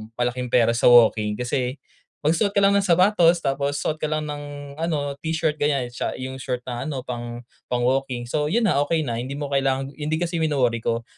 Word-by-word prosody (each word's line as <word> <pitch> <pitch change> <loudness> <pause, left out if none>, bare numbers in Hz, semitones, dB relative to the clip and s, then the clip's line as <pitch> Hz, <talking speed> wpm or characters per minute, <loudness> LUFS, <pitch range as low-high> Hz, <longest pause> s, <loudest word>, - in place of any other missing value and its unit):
malaking 125 +1 -1
pera 120 -1 +3
sa 115 - +2
walking, 110 -3 +5
kasi 125 +2 -2 0.5
magsuot 185 +7 +1
ka 200 - +3
lang 195 - +5
ng 195 - -1
sapatos, 175 -1 +4
tapos 140 +1 -1
suot 155 +4 -2
ka 155 - -1
lang 155 0 -1
ng 145 -1 -5 0.4
ano 145 -4 -2
t-shirt 160 -2 -1
gan'yan, 140 -4 0
siya - - -3
yung 130 +1 -6
short 125 -2 -4
na 125 +3 -5
ano, 135 -4 -4
pang, 120 -1 -6 0.2
pang 120 -1 -1
walking. 130 -1 0
So, 150 +5 -1
yun 225 +8 +1
na, 140 - +2
okay 160 -2 +1
na, 120 -3 -3
hindi 130 +3 -5
mo 145 -1 -5
kailangan 135 0 0
yun 150 - -3
din 160 +1 0
kasi 170 -1 -2
yung 160 - +2
wino-worry 120 -4 +1
ko, 115 +1 -2
135 Hz, 215 wpm, -23 LUFS, 125-155 Hz, 0.5 s, walking